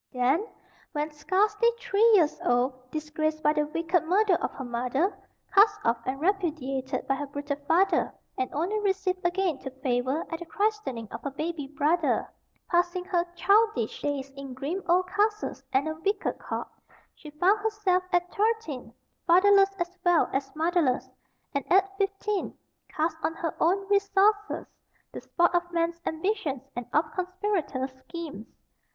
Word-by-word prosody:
Then, 270 - +1 0.5
when 300 +1 -2
scarcely 415 +9 +2
three 415 -2 +1
years 325 -6 +2
old, 255 +1 0
disgraced 310 +1 -2
by 300 - +4
the 300 -1 0
wicked 335 +2 0
murder 385 +4 +3
of - - 0
her 270 - -6
mother, 255 +10 -1 0.4
cast 415 +1 +6
off 230 0 +2
and 265 +1 -2
repudiated 290 -8 -1
by 270 - +2
her 290 +1 -4
brutal 285 0 -4
father, 360 +1 +3 0.2
and 255 - -2
only 360 +9 -1
received 385 -2 -1
again 350 -3 0
to 265 - -6
favor 260 +2 -1
at 330 - -3
the 345 - -7
christening 405 - -1
of - - -6
her 280 - -3
baby 305 +1 -4
brother, 300 +4 +1 0.4
passing 350 +1 +1
her 355 -2 +1
childish 400 - +2
days 275 -2 -2
in 275 -2 -8
grim 300 +9 -3
old 360 +1 +4
castles 420 +2 0
and 270 +4 +2
a 315 - -1
wicked 400 +1 -1
court, - - -4 0.5
she 305 - -12
found 360 +8 +3
herself, 415 -4 +1
at 355 0 +1
thirteen, 415 - -1 0.4
fatherless 390 +3 +6
as 345 +1 -4
well 350 -2 +4
as 270 +1 -2
motherless, 320 -5 +1 0.5
and 280 -2 -1
at 390 +1 +4
fifteen 395 0 -1 0.3
cast 315 +1 -1
on 325 - -1
her 330 -1 -3
own 390 +4 +2
resources, 405 +1 +2 0.5
the - - -7
sport 345 0 +2
of 350 0 0
men's 335 0 -1
ambitions 320 - -1
and 245 -1 -5
of 305 +2 +3
conspirators' 365 -8 -2
schemes. 295 - -8
335 Hz, 155 wpm, -27 LUFS, 280-390 Hz, 0.5 s, cast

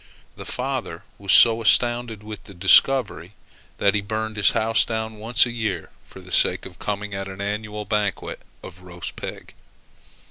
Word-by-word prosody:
The - - -9
father - - -4 0.2
was 100 -1 -1
so 115 -1 +7
astounded 120 -1 +2
with 105 -1 -9
the 100 - -13
discovery, 95 0 +3 0.4
that 100 -1 +2
he 105 - 0
burned 110 +2 -4
his 105 -1 +5
house 115 0 +2
down 110 -1 -4
once 115 +3 +3
a 120 - -5
year 115 -2 -4
for - - -14
the - - -12
sake - - +2
of - - -12
coming 105 0 -4
at 95 0 -5
an 95 0 -9
annual 105 +1 -4
banquet 105 -2 -2 0.2
of 90 - -12
roast 90 -2 -8
pig. - - -8
105 Hz, 170 wpm, -22 LUFS, 100-110 Hz, 0.4 s, so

